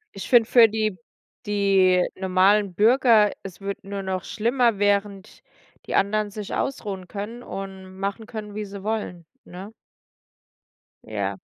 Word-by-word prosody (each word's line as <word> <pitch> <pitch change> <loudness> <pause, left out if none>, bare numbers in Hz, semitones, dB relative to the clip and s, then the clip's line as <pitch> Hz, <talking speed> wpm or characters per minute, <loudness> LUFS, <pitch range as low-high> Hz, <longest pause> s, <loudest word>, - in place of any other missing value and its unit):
Ich 195 - -7
find 235 -3 +5
für 235 -2 +6
die 215 -2 -1 0.5
die 195 -3 +3
normalen 190 +1 +2
Bürger 225 0 +5
es 190 -1 -10
wird 200 0 -5
nur 195 0 -5
noch 190 -1 -3
schlimmer, 235 0 +1
während 200 0 -1 0.5
die - - -2
anderen 210 +1 +1
sich 205 0 -7
ausruhen 195 -8 -3
können 215 +4 -6
und 190 -3 -8
machen 200 +3 -4
können, 210 -2 -7
wie 215 - -3
sie 200 -1 -9
wollen, 205 -6 -4 0.2
ne? 190 +5 -10 1.3
Ja. 100 -3 -3
200 Hz, 135 wpm, -24 LUFS, 190-215 Hz, 1.3 s, für